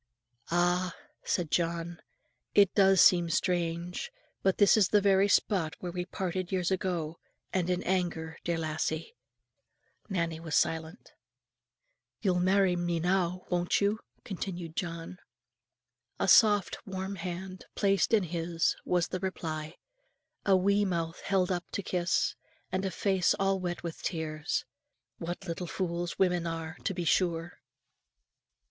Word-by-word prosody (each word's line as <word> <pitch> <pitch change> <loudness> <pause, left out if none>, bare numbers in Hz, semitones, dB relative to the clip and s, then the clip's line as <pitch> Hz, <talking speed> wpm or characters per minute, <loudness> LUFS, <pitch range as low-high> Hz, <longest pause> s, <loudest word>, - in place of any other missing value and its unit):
"Ah!" 175 +1 +1 0.3
said 170 -4 -1
John, 170 0 -1 0.5
"it 200 -2 +6
does 195 -2 +5
seem 175 -2 +6
strange, 170 0 -1 0.3
but 190 -1 +2
this 205 - +6
is 210 -4 +4
the 210 - +5
very 195 0 +4
spot 190 -5 +2
where 180 - -5
we 180 0 -3
parted 185 -1 -3
years 185 -1 0
ago, 175 -4 -2 0.3
and 180 -2 0
in 180 0 0
anger, 170 -3 -1
dear 170 -1 0
lassie." 160 0 -2 1.0
Nannie 170 -4 -1
was 160 -3 -3
silent. 160 +5 -1 1.1
"You'll 185 -4 +1
marry 190 0 +3
me 175 -1 -1
now; 180 +1 0
won't 175 0 +2
you?" 205 +2 +1 0.2
continued 175 -4 -5
John. 170 0 -5 1.0
A - - +1
soft 205 0 +5
warm 190 0 -4
hand 185 +2 -6
placed 195 -2 +2
in 220 -3 +4
his, 170 -1 0
was 175 -2 +1
the 185 - -3
reply; 155 -4 -4 0.7
a 195 -1 +6
wee 200 +2 +3
mouth 170 -3 -2
held 190 -2 +2
up 180 -1 -1
to 200 - -2
kiss, 185 +3 +1 0.4
and 190 +1 -1
a - - 0
face 190 -2 +2
all 195 0 +1
wet 175 -2 -4
with 170 -2 -6
tears. 155 -3 -2 0.5
What 175 +3 -5
little 175 +1 -4
fools 175 -1 -3
women 180 -2 +2
are, 165 0 -4
to 195 - 0
be 175 -1 -3
sure! 170 0 0
180 Hz, 140 wpm, -30 LUFS, 170-190 Hz, 1.1 s, it